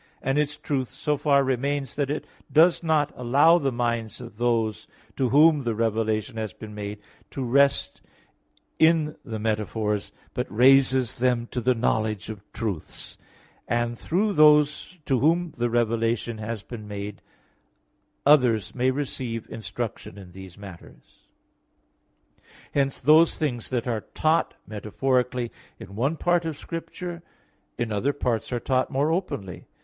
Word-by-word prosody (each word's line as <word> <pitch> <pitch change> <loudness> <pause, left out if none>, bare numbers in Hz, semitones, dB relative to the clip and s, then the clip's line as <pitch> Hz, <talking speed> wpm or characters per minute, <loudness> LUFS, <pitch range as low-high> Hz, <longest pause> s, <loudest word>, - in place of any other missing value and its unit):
i); - - -2
and 135 +2 +2
its 150 0 -1
truth 135 -5 -2
so 150 - -1
far 140 -1 +3
remains 135 +2 -1
that 140 -2 -1
it 150 - -3 0.3
does 165 +3 +5
not 155 -3 +1
allow 140 +8 +4
the 140 -3 0
minds 120 -2 -2
of 120 -4 -10
those 115 -3 0 0.3
to 130 -3 0
whom 150 +2 +5
the 120 -3 -2
revelation 110 +1 -1
has 110 -2 -4
been 110 -1 -10
made, 105 0 -5 0.3
to 135 - -4
rest 140 +3 +2 0.8
in 160 -2 +3
the 110 -2 -5
metaphors, 105 -1 -2 0.2
but - - -2
raises 130 +1 +4
them 125 -2 +1
to 125 +1 -4
the 125 +2 +2
knowledge 110 -3 -1
of 105 -3 -9
truths; 105 -9 -6 0.5
and 120 0 0
through 200 - 0
those 150 +2 +4
to 130 -3 +1
whom 165 +4 +2
the 120 0 +1
revelation 115 -1 0
has 110 -1 -5
been 110 -4 -9
made 105 0 -6 1.0
others 125 -9 +4
also - - -16
may 130 +1 +3
receive 130 -4 -3
instruction 110 -3 -6
in 95 -3 -11
these 95 0 -11
matters. 100 -4 -14 1.5
Hence 135 -1 0
those 155 +4 +5
things 125 -7 -2
that 125 -1 -2
are 115 -3 -1
taught 155 +8 0
metaphorically 125 +3 -1 0.3
in 100 - -11
one 135 +9 0
part 175 +1 +2
of 160 -3 -4
Scripture, 170 +1 -6 0.6
in 120 -2 -2
other 120 +8 0
parts 120 -5 -2
are 120 - -1
taught 130 +1 0
more 145 +3 +1
openly. 135 - -4
125 Hz, 145 wpm, -25 LUFS, 110-145 Hz, 1.5 s, does